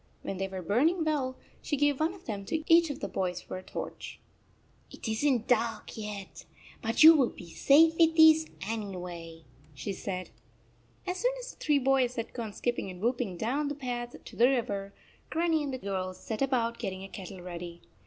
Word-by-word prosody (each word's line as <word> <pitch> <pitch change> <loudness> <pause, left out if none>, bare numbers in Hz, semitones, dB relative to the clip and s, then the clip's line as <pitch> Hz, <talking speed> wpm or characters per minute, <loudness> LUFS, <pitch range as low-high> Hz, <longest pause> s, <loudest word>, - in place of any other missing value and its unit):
When 195 - -4
they 195 - -1
were 190 -1 -6
burn 240 - +3
ing 345 -2 -2
well, 270 -4 -1 0.2
she 290 - -2
gave 290 -1 +2
one 325 +4 +1
of 370 - -16
them 205 -3 -4
to 315 +8 -2
each 335 0 +5
of 285 - -5
the - - -2
boys 180 -2 -2
for - - -7
a - - -7
torch. - - -7 0.4
" - - -35
It - - -8
is 220 +4 -1
n 265 -6 +3
t - - -18
dark 230 -1 0
yet, 210 -3 -7 0.4
but 225 +5 +2
you 320 +1 +11
will 265 -6 +3
be 170 -2 -12
safer 320 +3 +5
with 325 -1 +5
these, 315 0 +7 0.2
anyway," 180 -6 -6 0.3
she 195 +8 -4
said. 185 -1 -5 0.7
As 360 0 -2
soon - - +1
as - - -7
the - - -25
three 295 -1 +3
boys 260 -2 +2
had 230 -1 -4
gone 230 -3 -4
skip 240 +3 -1
ping - - -4
and 180 -1 -9
whooping 235 -4 -1
down 270 - -1
the 290 - -3
path 245 -3 -4
to - - -11
the 240 +2 +5
river, 200 -6 -1 0.4
Grannie 325 -1 +1
and 285 -2 -3
the 260 - -3
girls 190 -4 -4
set 220 +1 -5
about 240 -4 +1
get - - -2
ting 190 0 -7
a - - -7
kettle 190 -1 -9
ready. 175 -1 -7
240 Hz, 215 wpm, -30 LUFS, 195-290 Hz, 0.7 s, you